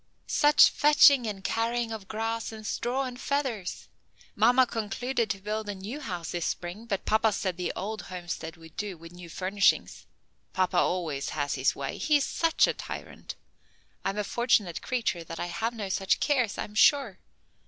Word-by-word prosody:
Such 295 Hz, +1 st, +6 dB
fetching 285 Hz, -4 st, +6 dB
and 200 Hz, -2 st, -5 dB
carrying 230 Hz, +2 st, -1 dB
of 215 Hz, -3 st, -6 dB
grass 225 Hz, +1 st, -3 dB
and 215 Hz, -1 st, -9 dB
straw 250 Hz, +4 st, -1 dB
and 250 Hz, -1 st, -6 dB
feathers! 260 Hz, -10 st, -2 dB, 0.5 s
Mamma 245 Hz, +5 st, +5 dB
concluded 235 Hz, +1 st, -2 dB
to 195 Hz, -, -1 dB
build 210 Hz, +2 st, -4 dB
a 205 Hz, -, -3 dB
new 205 Hz, +9 st, -6 dB
house 180 Hz, -, -5 dB
this 175 Hz, -2 st, -2 dB
spring 180 Hz, +6 st, -5 dB
but 200 Hz, -4 st, -2 dB
papa 220 Hz, 0 st, +3 dB
said 190 Hz, -3 st, -2 dB
the 180 Hz, 0 st, -2 dB
old 215 Hz, +2 st, -4 dB
homestead 175 Hz, -3 st, -6 dB
would 165 Hz, -1 st, -15 dB
do, 205 Hz, -4 st, -4 dB
with 165 Hz, +1 st, -12 dB
new 175 Hz, -1 st, -11 dB
furnishings. 195 Hz, +3 st, +1 dB, 0.5 s
Papa 185 Hz, -1 st, +1 dB
always 165 Hz, -6 st, 0 dB
has 145 Hz, -1 st, 0 dB
his 130 Hz, -1 st, +1 dB
way; 140 Hz, -1 st, -5 dB
he's 295 Hz, -3 st, +3 dB
such 330 Hz, -1 st, +2 dB
a -, -, 0 dB
tyrant. -, -, -8 dB, 0.7 s
I'm 195 Hz, +1 st, -2 dB
a 210 Hz, -, 0 dB
fortunate 210 Hz, -6 st, +1 dB
creature 225 Hz, -9 st, -1 dB
that 165 Hz, 0 st, -8 dB
I -, -, -2 dB
have 225 Hz, +7 st, -3 dB
no 210 Hz, -3 st, -4 dB
such 190 Hz, 0 st, +1 dB
cares, 255 Hz, -8 st, +1 dB
I'm 210 Hz, -, -5 dB
sure. 230 Hz, -3 st, +4 dB
210 Hz, 175 wpm, -28 LUFS, 180-240 Hz, 0.7 s, Such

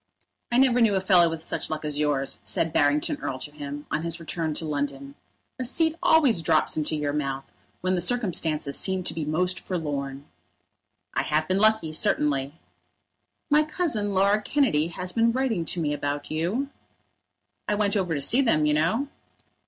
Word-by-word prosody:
"I 240 Hz, -, +2 dB
never 250 Hz, -2 st, +4 dB
knew 215 Hz, -3 st, +4 dB
a -, -, +2 dB
fellow 185 Hz, -3 st, +4 dB
with 165 Hz, -1 st, -6 dB
such -, -, -2 dB
luck 155 Hz, -1 st, -4 dB
as 150 Hz, -1 st, -1 dB
yours," 140 Hz, -2 st, -1 dB
said 165 Hz, -1 st, -1 dB
Barrington 145 Hz, +1 st, +2 dB
Erle 130 Hz, -, -4 dB
to 145 Hz, -, -5 dB
him, 145 Hz, 0 st, -7 dB
on 150 Hz, -, 0 dB
his 170 Hz, +1 st, -1 dB
return 160 Hz, -1 st, -3 dB
to 160 Hz, -, -3 dB
London. 140 Hz, -2 st, -3 dB, 0.5 s
"A -, -, -1 dB
seat 320 Hz, +5 st, +2 dB
always 275 Hz, -, +4 dB
drops 160 Hz, -1 st, +2 dB
into 155 Hz, 0 st, -1 dB
your 145 Hz, -1 st, -2 dB
mouth 135 Hz, -2 st, -3 dB, 0.3 s
when 185 Hz, +1 st, 0 dB
the 180 Hz, -, 0 dB
circumstances 170 Hz, -, 0 dB
seem 190 Hz, -1 st, +1 dB
to -, -, -2 dB
be 160 Hz, -2 st, -3 dB
most 180 Hz, +5 st, 0 dB
forlorn." 140 Hz, -5 st, -4 dB, 0.9 s
"I -, -, +1 dB
have 155 Hz, +1 st, 0 dB
been 185 Hz, +1 st, +1 dB
lucky, 215 Hz, -6 st, +3 dB
certainly." 145 Hz, -2 st, +1 dB, 1.0 s
"My 300 Hz, +1 st, +6 dB
cousin, 300 Hz, -, -1 dB
Laura 200 Hz, +2 st, +3 dB
Kennedy, 215 Hz, -, +1 dB
has 180 Hz, +2 st, -5 dB
been 230 Hz, 0 st, +3 dB
writing 240 Hz, -9 st, 0 dB
to 175 Hz, -, -3 dB
me 150 Hz, -3 st, 0 dB
about 145 Hz, 0 st, -3 dB
you." 185 Hz, -, -1 dB, 1.0 s
"I 210 Hz, -, +1 dB
went 205 Hz, -1 st, +1 dB
over 180 Hz, -5 st, 0 dB
to 140 Hz, -, -2 dB
see 240 Hz, -, +3 dB
them, 155 Hz, -, +2 dB
you 150 Hz, -, +2 dB
know." 170 Hz, -, +1 dB
165 Hz, 180 wpm, -25 LUFS, 150-210 Hz, 1.0 s, My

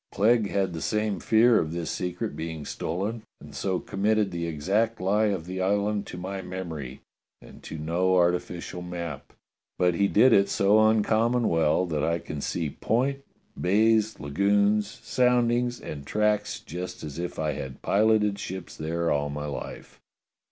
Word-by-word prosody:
Clegg 110 Hz, 0 st, +3 dB
had 95 Hz, -3 st, 0 dB
the 80 Hz, -, -5 dB
same 105 Hz, -1 st, -1 dB
fear 115 Hz, +1 st, +4 dB
of 80 Hz, -, -2 dB
this 85 Hz, -1 st, -3 dB
secret 90 Hz, -4 st, -3 dB
being 80 Hz, -1 st, -5 dB
stolen 100 Hz, +11 st, -3 dB, 0.2 s
and -, -, -13 dB
so 95 Hz, -2 st, -1 dB
committed 105 Hz, +1 st, 0 dB
the 85 Hz, -1 st, -3 dB
exact 100 Hz, +9 st, 0 dB
lie 105 Hz, +4 st, +2 dB
of 95 Hz, -6 st, -2 dB
the 95 Hz, +1 st, -4 dB
island 100 Hz, +2 st, 0 dB
to -, -, -7 dB
my 95 Hz, +2 st, -5 dB
memory, 80 Hz, -8 st, -6 dB, 0.4 s
and -, -, -15 dB
to 80 Hz, -, -7 dB
no 85 Hz, +4 st, +1 dB
arti 90 Hz, 0 st, +4 dB
ficial 90 Hz, 0 st, -8 dB
map, 85 Hz, -5 st, -6 dB, 0.5 s
but 90 Hz, -1 st, +3 dB
he 100 Hz, +4 st, +2 dB
did 115 Hz, +5 st, +5 dB
it 100 Hz, -1 st, +4 dB
so 110 Hz, +2 st, +4 dB
uncommon 110 Hz, +2 st, +2 dB
well 80 Hz, +2 st, +2 dB
that 80 Hz, -4 st, -2 dB
I 85 Hz, +1 st, +1 dB
can 75 Hz, -3 st, -6 dB
see 80 Hz, -1 st, -2 dB
point, 135 Hz, -, 0 dB, 0.3 s
bays, 110 Hz, +3 st, +2 dB
lagoons, 100 Hz, +7 st, +2 dB, 0.2 s
soundings, 125 Hz, -1 st, +2 dB
and 70 Hz, -2 st, -7 dB
tracks 105 Hz, +5 st, 0 dB
just 90 Hz, +1 st, -7 dB
as 75 Hz, +1 st, -6 dB
if 90 Hz, 0 st, -4 dB
I 80 Hz, -1 st, 0 dB
had 65 Hz, -2 st, -7 dB
piloted 105 Hz, -1 st, +2 dB
ships 95 Hz, -2 st, -6 dB
there 85 Hz, +2 st, -1 dB
all 75 Hz, 0 st, 0 dB
my 75 Hz, +1 st, -4 dB
life." 70 Hz, -2 st, -7 dB
95 Hz, 165 wpm, -26 LUFS, 85-105 Hz, 0.5 s, did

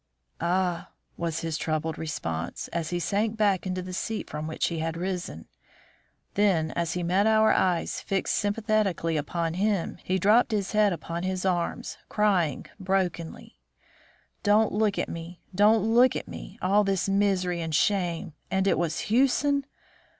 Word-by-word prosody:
"Ah!" 175 Hz, 0 st, 0 dB, 0.3 s
was 165 Hz, -2 st, -2 dB
his 165 Hz, -2 st, -3 dB
troubled 155 Hz, 0 st, -1 dB
response, 85 Hz, -, -4 dB
as 165 Hz, -2 st, -3 dB
he 175 Hz, -, -1 dB
sank 210 Hz, +5 st, 0 dB
back 200 Hz, -4 st, +2 dB
into 185 Hz, 0 st, -2 dB
the 185 Hz, 0 st, -7 dB
seat 220 Hz, +4 st, -3 dB
from 150 Hz, +1 st, -4 dB
which 160 Hz, -, -1 dB
he 165 Hz, -2 st, -3 dB
had 165 Hz, +1 st, -2 dB
risen. 180 Hz, 0 st, -4 dB, 0.9 s
Then 180 Hz, -6 st, +2 dB
as 170 Hz, -1 st, -1 dB
he 180 Hz, -, -2 dB
met 185 Hz, +5 st, +2 dB
our 220 Hz, 0 st, +5 dB
eyes 180 Hz, -3 st, +1 dB
fixed 195 Hz, -1 st, -1 dB
sympathetically 205 Hz, -5 st, 0 dB
upon 165 Hz, +2 st, -1 dB
him, 195 Hz, -2 st, -1 dB
he 185 Hz, -, 0 dB
dropped 215 Hz, +5 st, +4 dB
his 200 Hz, -3 st, -1 dB
head 210 Hz, -1 st, +4 dB
upon 170 Hz, 0 st, -4 dB
his 185 Hz, 0 st, -2 dB
arms, 175 Hz, -2 st, -1 dB
crying 185 Hz, -9 st, +1 dB
brokenly: 185 Hz, -, -2 dB, 0.8 s
"Don't 210 Hz, +2 st, +3 dB
look 210 Hz, -1 st, +1 dB
at -, -, -1 dB
me! 170 Hz, +1 st, -7 dB
Don't 210 Hz, +2 st, +4 dB
look 240 Hz, +3 st, +4 dB
at -, -, -4 dB
me! 195 Hz, -, -9 dB
All 200 Hz, +3 st, +4 dB
this 195 Hz, -2 st, 0 dB
misery 195 Hz, -3 st, +1 dB
and 160 Hz, -2 st, -2 dB
shame! 175 Hz, -5 st, 0 dB, 0.2 s
And 190 Hz, 0 st, +1 dB
it 195 Hz, -, +2 dB
was 170 Hz, -2 st, -1 dB
Hewson! 275 Hz, +4 st, +2 dB
185 Hz, 155 wpm, -27 LUFS, 170-205 Hz, 0.9 s, our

